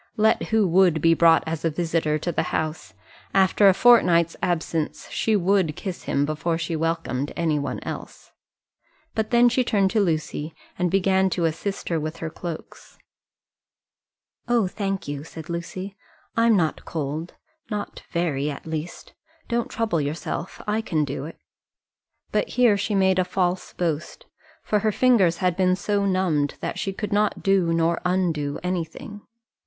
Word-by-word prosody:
Let 220 Hz, +1 st, +3 dB
who 220 Hz, -3 st, +3 dB
would 175 Hz, -2 st, +4 dB
be 165 Hz, +2 st, +4 dB
brought 165 Hz, 0 st, +5 dB
as 160 Hz, -1 st, -4 dB
a 165 Hz, -, +2 dB
visitor 160 Hz, -1 st, 0 dB
to 175 Hz, +3 st, -3 dB
the -, -, 0 dB
house, 155 Hz, 0 st, -3 dB, 0.4 s
after 195 Hz, +1 st, +5 dB
a -, -, +5 dB
fortnight's 175 Hz, -9 st, +5 dB
absence, 165 Hz, -2 st, -2 dB
she 220 Hz, -, +1 dB
would 190 Hz, -4 st, +2 dB
kiss 185 Hz, 0 st, -6 dB
him 140 Hz, -, +1 dB
before 165 Hz, +2 st, -1 dB
she 165 Hz, 0 st, -3 dB
welcomed 160 Hz, -4 st, -2 dB
any 160 Hz, -3 st, +1 dB
one 140 Hz, -, -3 dB
else. -, -, -8 dB, 0.8 s
But 220 Hz, -1 st, -1 dB
then 240 Hz, 0 st, +5 dB
she 250 Hz, +1 st, +2 dB
turned 200 Hz, -5 st, +2 dB
to 220 Hz, -, +2 dB
Lucy, 160 Hz, -4 st, -1 dB, 0.2 s
and 180 Hz, 0 st, +2 dB
began 190 Hz, +1 st, +2 dB
to 175 Hz, -2 st, 0 dB
assist 195 Hz, +5 st, -3 dB
her 165 Hz, -2 st, +1 dB
with 155 Hz, +2 st, -4 dB
her 160 Hz, -1 st, -5 dB
cloaks. 170 Hz, -1 st, -8 dB, 1.5 s
"Oh, 240 Hz, -3 st, +3 dB
thank 195 Hz, -1 st, -3 dB
you," 145 Hz, 0 st, -4 dB
said 160 Hz, +1 st, -9 dB
Lucy; 185 Hz, +3 st, -5 dB, 0.4 s
"I'm 230 Hz, -2 st, +4 dB
not 160 Hz, -4 st, 0 dB
cold, 155 Hz, +2 st, -4 dB, 0.3 s
not 210 Hz, -2 st, -5 dB
very 150 Hz, -5 st, 0 dB
at 140 Hz, -, -7 dB
least. 160 Hz, +1 st, -6 dB, 0.4 s
Don't 235 Hz, -1 st, 0 dB
trouble 215 Hz, -9 st, 0 dB
yourself: 155 Hz, +4 st, -4 dB
I 210 Hz, +1 st, 0 dB
can 155 Hz, -8 st, 0 dB
do 140 Hz, 0 st, -5 dB
it." 165 Hz, -, -9 dB, 0.9 s
But -, -, +1 dB
here 245 Hz, -4 st, +4 dB
she 205 Hz, +2 st, -2 dB
had 195 Hz, -, +3 dB
made 190 Hz, -1 st, +3 dB
a -, -, +4 dB
false 180 Hz, 0 st, -1 dB
boast, 165 Hz, -3 st, -3 dB, 0.4 s
for 210 Hz, -, +1 dB
her 215 Hz, +1 st, +1 dB
fingers 205 Hz, -8 st, +3 dB
had 180 Hz, -1 st, +1 dB
been 185 Hz, 0 st, +3 dB
so 200 Hz, +1 st, 0 dB
numbed 175 Hz, -7 st, +1 dB
that -, -, -4 dB
she 195 Hz, -, -2 dB
could 205 Hz, +1 st, -4 dB
not 210 Hz, 0 st, +1 dB
do 195 Hz, -4 st, +3 dB
nor 165 Hz, 0 st, +1 dB
undo 170 Hz, -6 st, 0 dB
anything. 180 Hz, +3 st, -4 dB
175 Hz, 165 wpm, -24 LUFS, 160-200 Hz, 1.5 s, brought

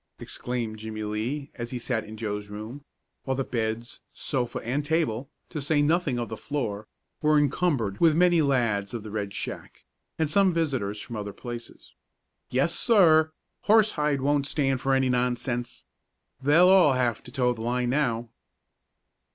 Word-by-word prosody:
exclaimed 115 Hz, -3 st, -5 dB
Jimmie 110 Hz, 0 st, -5 dB
Lee, 120 Hz, +8 st, -3 dB
as 120 Hz, -2 st, -6 dB
he 125 Hz, -, -4 dB
sat 120 Hz, -2 st, -2 dB
in 110 Hz, +1 st, -9 dB
Joe's 105 Hz, -2 st, -4 dB
room, 110 Hz, +7 st, -8 dB, 0.4 s
while 130 Hz, -1 st, -2 dB
the 135 Hz, -, 0 dB
beds, 115 Hz, -1 st, -3 dB
sofa 125 Hz, -4 st, -2 dB
and 135 Hz, +5 st, -1 dB
table, 145 Hz, -5 st, -1 dB, 0.2 s
to 155 Hz, -, -4 dB
say 145 Hz, +2 st, +1 dB
nothing 155 Hz, -4 st, +1 dB
of 120 Hz, -1 st, -2 dB
the 110 Hz, -, -5 dB
floor, 110 Hz, -6 st, -4 dB, 0.3 s
were 150 Hz, 0 st, +4 dB
encumbered 140 Hz, -, +1 dB
with 165 Hz, -2 st, +5 dB
many 175 Hz, -1 st, +4 dB
lads 120 Hz, -7 st, +1 dB
of 115 Hz, -, -5 dB
the 110 Hz, -, -8 dB
Red 100 Hz, -2 st, -3 dB
Shack, -, -, -7 dB, 0.3 s
and 160 Hz, -, +1 dB
some 185 Hz, +3 st, +3 dB
visitors 130 Hz, -11 st, -1 dB
from 120 Hz, 0 st, -6 dB
other 105 Hz, -1 st, -5 dB
places. 120 Hz, +2 st, -9 dB, 0.6 s
"Yes, 135 Hz, +6 st, +2 dB
sir! 160 Hz, -8 st, +5 dB, 0.3 s
Horsehide 165 Hz, -10 st, +3 dB
won't 140 Hz, 0 st, +1 dB
stand 135 Hz, -3 st, 0 dB
for 135 Hz, 0 st, +2 dB
any 130 Hz, 0 st, +2 dB
nonsense. 125 Hz, 0 st, -1 dB, 0.6 s
They'll 155 Hz, +7 st, +5 dB
all 185 Hz, -7 st, +6 dB
have 120 Hz, -4 st, 0 dB
to 125 Hz, -, -13 dB
toe 125 Hz, -2 st, +1 dB
the 115 Hz, -, -9 dB
line 120 Hz, +1 st, 0 dB
now." 120 Hz, -5 st, 0 dB
125 Hz, 160 wpm, -26 LUFS, 115-150 Hz, 0.6 s, all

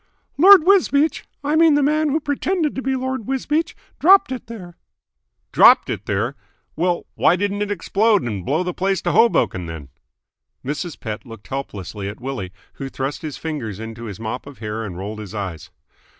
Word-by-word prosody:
"Lord 370 Hz, +3 st, +8 dB
Wisbeach 325 Hz, -5 st, +3 dB, 0.2 s
I 295 Hz, +2 st, 0 dB
mean 320 Hz, -2 st, +5 dB
the 290 Hz, -, +3 dB
man 305 Hz, +2 st, +2 dB
who 300 Hz, +3 st, +1 dB
pretended 305 Hz, +2 st, -1 dB
to 265 Hz, -, -4 dB
be 265 Hz, 0 st, -1 dB
Lord 260 Hz, -3 st, -3 dB
Wisbeach 295 Hz, +5 st, -1 dB, 0.2 s
dropped 380 Hz, -3 st, +6 dB
it 255 Hz, -3 st, -5 dB
there." 185 Hz, -7 st, -9 dB, 0.8 s
"Dropped -, -, +6 dB
it -, -, -5 dB
there? 105 Hz, +7 st, -1 dB, 0.4 s
Well, 175 Hz, +1 st, 0 dB
why 175 Hz, -, +3 dB
didn't 205 Hz, +2 st, -2 dB
it 205 Hz, -, -1 dB
explode 205 Hz, +2 st, +2 dB
and 105 Hz, -6 st, -4 dB
blow 155 Hz, -, 0 dB
the 180 Hz, 0 st, -3 dB
place 190 Hz, 0 st, -1 dB
to -, -, 0 dB
Hoboken, 95 Hz, -, +2 dB
then?" 80 Hz, -4 st, -8 dB, 0.8 s
Mrs. 150 Hz, +4 st, -4 dB
Pett 110 Hz, -4 st, -5 dB
looked 115 Hz, -5 st, -13 dB
helplessly 105 Hz, -7 st, -5 dB
at 100 Hz, -, -9 dB
Willie, 125 Hz, -8 st, -5 dB, 0.2 s
who 135 Hz, -1 st, -6 dB
thrust 135 Hz, +2 st, -4 dB
his 155 Hz, -3 st, -6 dB
fingers 125 Hz, -, -5 dB
into 115 Hz, +1 st, -7 dB
his 100 Hz, -3 st, -7 dB
mop 115 Hz, +4 st, -5 dB
of 140 Hz, -3 st, -11 dB
hair 110 Hz, +1 st, -4 dB
and 95 Hz, -5 st, -6 dB
rolled 105 Hz, +3 st, -6 dB
his 105 Hz, -1 st, -8 dB
eyes. 95 Hz, -6 st, -5 dB
160 Hz, 180 wpm, -21 LUFS, -, 0.8 s, Lord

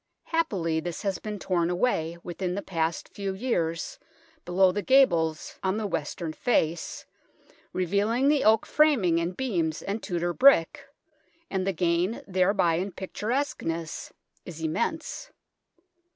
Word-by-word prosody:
Happily 195 Hz, -, 0 dB
this 170 Hz, +1 st, -5 dB
has 195 Hz, -2 st, -1 dB
been 210 Hz, -1 st, -5 dB
torn 175 Hz, -3 st, 0 dB
away, 175 Hz, -4 st, 0 dB
within 180 Hz, +1 st, -3 dB
the 200 Hz, -, -3 dB
past 165 Hz, -2 st, -2 dB
few 195 Hz, -1 st, -3 dB
years, 170 Hz, -8 st, -2 dB, 0.5 s
below 185 Hz, +1 st, +4 dB
the 205 Hz, +3 st, -2 dB
gables 170 Hz, -, +2 dB
on 190 Hz, +2 st, 0 dB
the 220 Hz, -, -2 dB
western 170 Hz, -2 st, -3 dB
face, 165 Hz, -6 st, -1 dB, 0.7 s
revealing 205 Hz, +8 st, +1 dB
the 290 Hz, -1 st, +3 dB
oak 220 Hz, +1 st, +4 dB
framing 235 Hz, -, +3 dB
and 175 Hz, +2 st, -3 dB
beams 170 Hz, -11 st, -1 dB
and 205 Hz, +3 st, -3 dB
Tudor 175 Hz, -2 st, -2 dB
brick, 255 Hz, -9 st, +4 dB, 0.6 s
and 190 Hz, -1 st, -1 dB
the -, -, +3 dB
gain 175 Hz, +4 st, 0 dB
thereby 185 Hz, -3 st, +2 dB
in 190 Hz, +2 st, -3 dB
pictur 190 Hz, +2 st, -6 dB
esqueness 165 Hz, -, -2 dB, 0.3 s
is 170 Hz, -3 st, -9 dB
immense. 315 Hz, -, -2 dB
185 Hz, 135 wpm, -27 LUFS, 170-215 Hz, 0.7 s, below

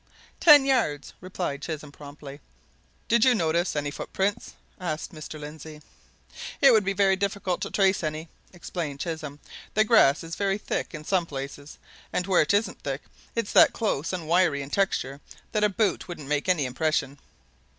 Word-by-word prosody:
"Ten 295 Hz, -4 st, +8 dB
yards," 230 Hz, -, 0 dB
replied 180 Hz, -6 st, -4 dB
Chisholm 150 Hz, -2 st, -6 dB
promptly. 145 Hz, 0 st, -11 dB, 0.7 s
"Did 235 Hz, -1 st, +3 dB
you 255 Hz, -1 st, +5 dB
notice 170 Hz, -2 st, 0 dB
any 145 Hz, -1 st, -2 dB
footprints?" 200 Hz, +8 st, -3 dB, 0.3 s
asked 160 Hz, -3 st, -4 dB
Mr. 155 Hz, 0 st, -8 dB
Lindsey. 150 Hz, 0 st, -10 dB, 0.8 s
"It 275 Hz, -, +7 dB
would 220 Hz, -3 st, +4 dB
be 195 Hz, 0 st, -1 dB, 0.2 s
difficult 195 Hz, -2 st, -2 dB
to -, -, -3 dB
trace 195 Hz, -1 st, +2 dB
any," 155 Hz, +1 st, -3 dB, 0.2 s
explained 170 Hz, -5 st, -5 dB
Chisholm. 155 Hz, -4 st, -5 dB, 0.4 s
"The 215 Hz, -, +5 dB
grass 210 Hz, -, +4 dB
is 165 Hz, 0 st, -8 dB
very 195 Hz, -1 st, 0 dB
thick 205 Hz, -, -4 dB
in 155 Hz, -, -8 dB
some 175 Hz, 0 st, 0 dB
places, 140 Hz, +1 st, -7 dB, 0.3 s
and 180 Hz, -, -1 dB
where 190 Hz, -2 st, +4 dB
it 150 Hz, -, +1 dB
isn't 205 Hz, +2 st, 0 dB
thick -, -, -4 dB, 0.3 s
it's 230 Hz, -3 st, -2 dB
that 315 Hz, -7 st, +6 dB
close 165 Hz, -, -1 dB
and 175 Hz, -4 st, -5 dB
wiry 165 Hz, -4 st, +2 dB
in 140 Hz, -, -10 dB
texture 145 Hz, -8 st, -1 dB, 0.3 s
that 215 Hz, -1 st, 0 dB
a 210 Hz, -, +4 dB
boot 200 Hz, -2 st, 0 dB
wouldn't 165 Hz, -6 st, -8 dB
make 150 Hz, +4 st, -1 dB
any 165 Hz, -7 st, +2 dB
impression." 140 Hz, +1 st, -1 dB
165 Hz, 165 wpm, -26 LUFS, 150-200 Hz, 0.8 s, Ten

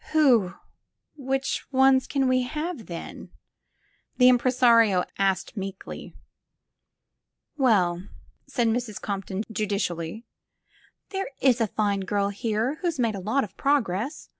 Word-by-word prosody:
'*Who 240 Hz, -, +4 dB, 0.3 s
— -, -, -55 dB
^which 270 Hz, 0 st, -1 dB
ones 265 Hz, 0 st, +4 dB
can 275 Hz, -2 st, 0 dB
we 255 Hz, 0 st, +3 dB
have, 300 Hz, -, -4 dB
then?" 170 Hz, -1 st, -8 dB, 0.9 s
the 250 Hz, -1 st, +7 dB
im 250 Hz, -1 st, +5 dB
presario 235 Hz, -7 st, +4 dB
asked 195 Hz, +3 st, 0 dB
meekly. 195 Hz, -2 st, -7 dB, 1.4 s
''Well," 190 Hz, -, +2 dB, 0.4 s
said 235 Hz, -2 st, 0 dB
Mrs. 225 Hz, -2 st, -2 dB
Compton 195 Hz, 0 st, -4 dB
judicially, 200 Hz, -1 st, -3 dB, 0.9 s
"there 390 Hz, 0 st, -3 dB
is 250 Hz, -3 st, +3 dB
a 225 Hz, -, +2 dB
fine 205 Hz, -1 st, 0 dB
girl 200 Hz, +1 st, -1 dB
here 225 Hz, +7 st, -2 dB
who's 345 Hz, -4 st, -1 dB
made 230 Hz, -3 st, +1 dB
a 200 Hz, -, -5 dB
lot 220 Hz, +9 st, 0 dB
of 205 Hz, -, -9 dB
progress. 270 Hz, -, -1 dB
230 Hz, 125 wpm, -25 LUFS, 200-265 Hz, 1.4 s, the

